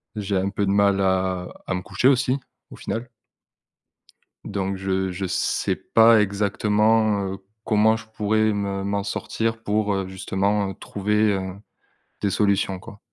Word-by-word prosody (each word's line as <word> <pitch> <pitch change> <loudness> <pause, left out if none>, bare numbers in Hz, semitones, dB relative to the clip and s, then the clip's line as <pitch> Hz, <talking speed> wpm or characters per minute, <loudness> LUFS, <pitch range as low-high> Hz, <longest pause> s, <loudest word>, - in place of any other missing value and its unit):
J'ai 100 -1 -2
un 95 +1 +1
peu 100 0 -1
de 95 - +1
mal 100 -1 +3
à 95 -1 0 0.2
à - - -1
me 90 - -2
coucher 125 +7 +2
aussi, 130 0 +2 0.3
au - - -11
final. 115 +2 -4 1.4
Donc, 100 -1 -2
je 95 0 -1
je 95 +1 -3
sais - - 0
pas 115 0 +5
exactement, 105 0 +1
heu, - - -6 0.3
comment 110 +1 +3
je 110 -1 -9
pourrais 110 0 +1
me 100 -1 -2
m'en 100 0 -1
sortir 115 +2 -2
pour, 105 -1 0
heu, 95 -1 -2
justement, 95 +2 -1
heu, - - -5
trouver, 105 +1 +1
heu, 95 -1 -3 0.7
des 100 - +1
solutions, 100 -2 +1
quoi. 105 +2 -12
100 Hz, 155 wpm, -23 LUFS, 95-110 Hz, 1.4 s, pas